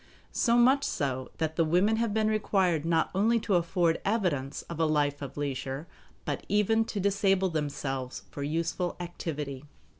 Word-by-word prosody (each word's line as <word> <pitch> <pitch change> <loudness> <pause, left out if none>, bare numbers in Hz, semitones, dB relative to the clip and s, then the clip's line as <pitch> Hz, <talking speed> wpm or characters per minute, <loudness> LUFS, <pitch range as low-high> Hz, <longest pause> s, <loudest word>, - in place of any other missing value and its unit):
So 235 -1 +3
much 260 +4 +5
so 130 - -2
that 160 -1 -2
the 165 - +4
women 180 +7 +3
have 230 -1 0
been 215 +1 +1
required 190 -7 +1
not 165 -1 +2
only 225 +5 +3
to 205 - -1
afford 170 -1 +2
evidence 175 -11 -1
of 170 -1 -8
a 165 - +3
life 145 -2 +1
of 140 0 -7
leisure, 135 0 -3 0.4
but - - -3
even 220 +2 +3
to 210 - -4
disable 195 -1 +2
themselves 140 -4 -3
for 145 - -6
useful 165 +4 -1
activity. 150 -5 -5
170 Hz, 160 wpm, -29 LUFS, 145-205 Hz, 0.4 s, much